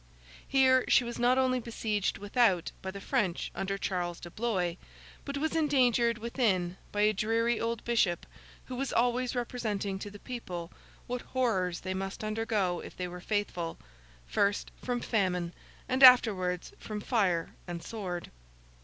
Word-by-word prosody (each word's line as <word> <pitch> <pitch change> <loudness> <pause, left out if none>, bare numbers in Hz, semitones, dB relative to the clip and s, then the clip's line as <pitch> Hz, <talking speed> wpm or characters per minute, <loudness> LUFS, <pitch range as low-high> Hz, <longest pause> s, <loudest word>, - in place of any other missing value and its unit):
Here 260 -1 +5
she 260 - +5
was 240 0 -5
not 245 +2 +4
only 255 -1 +2
besieged 220 -3 -1
without 205 -4 +2
by 190 - -4
the 200 +1 -6
French 185 -2 -1
under 195 +1 -2
Charles 175 -3 -2
de 175 - -9
Blois, 190 -5 0 0.5
but 280 0 -3
was 315 +3 -1
endangered 250 -7 +3
within 215 -7 0 0.2
by 205 - 0
a 210 +1 +4
dreary 225 +3 +1
old 230 0 -2
bishop, 220 -7 +1 0.4
who 255 - -6
was 270 +1 -2
always 245 +1 +1
representing 215 -5 -2
to 205 - -6
the 205 - -11
people 185 -8 -6 0.3
what 250 0 -3
horrors 190 -9 0
they 185 0 -3
must 195 +2 -4
undergo 215 -4 0
if - - -10
they 180 - -2
were 180 0 -8
faithful—first 165 - -2
from 245 -1 -1
famine, 180 -5 0 0.3
and 260 +1 0
afterwards 200 -9 +6
from 215 -1 -5
fire 195 -8 +1 0.2
and 170 -1 -5
sword. 180 -4 -5
210 Hz, 150 wpm, -30 LUFS, 180-240 Hz, 0.5 s, afterwards